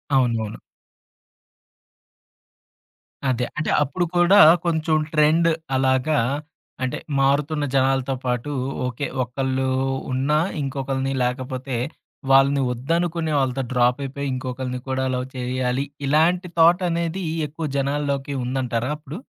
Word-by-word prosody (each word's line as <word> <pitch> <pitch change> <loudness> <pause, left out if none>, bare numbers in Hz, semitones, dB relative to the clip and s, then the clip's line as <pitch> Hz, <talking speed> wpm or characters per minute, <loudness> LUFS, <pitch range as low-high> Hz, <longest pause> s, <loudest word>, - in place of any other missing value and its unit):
అవునవును. 115 -4 +1 2.7
అదే. 125 -1 0
అంటే 155 - -1
అప్పుడు 175 +6 -1
కూడా 175 +4 +6 0.3
కొంచెం 160 -1 +1 0.2
ట్రెండ్ 160 +2 +4 0.3
అలాగా 130 +3 +2 0.7
అంటే 130 - -1 0.2
మారుతున్న 145 +2 +1
జనాలతో 135 0 +2
పాటు. 125 +3 -1 0.4
ఓకే 125 +3 -3 0.2
ఒకళ్ళు 130 +1 -2 0.4
ఉన్న 135 +3 0 0.3
ఇంకొకళని 135 0 -2
లేకపోతే 130 0 -3 0.5
వాళ్ళని 135 +1 +5
వద్దనుకుని 165 +5 -1
వాళ్ళతో 135 0 0
డ్రాప్ 125 +1 +2
అయిపోయి. 140 +1 -4
ఇంకొకళని 125 0 -4
కూడా 130 0 0
లవ్ 125 +1 -3
చేయాలి. 125 +1 -1 0.2
ఇలాంటి 170 +5 +3
థాట్ 175 +3 +5
అనేది 170 +2 -2 0.2
ఎక్కువ 155 +2 -6
జనాల్లోకి 140 0 -1
ఉందంటారా 125 -1 -1
అప్పుడు? 150 +4 -8
135 Hz, 100 wpm, -22 LUFS, 130-155 Hz, 2.7 s, కూడా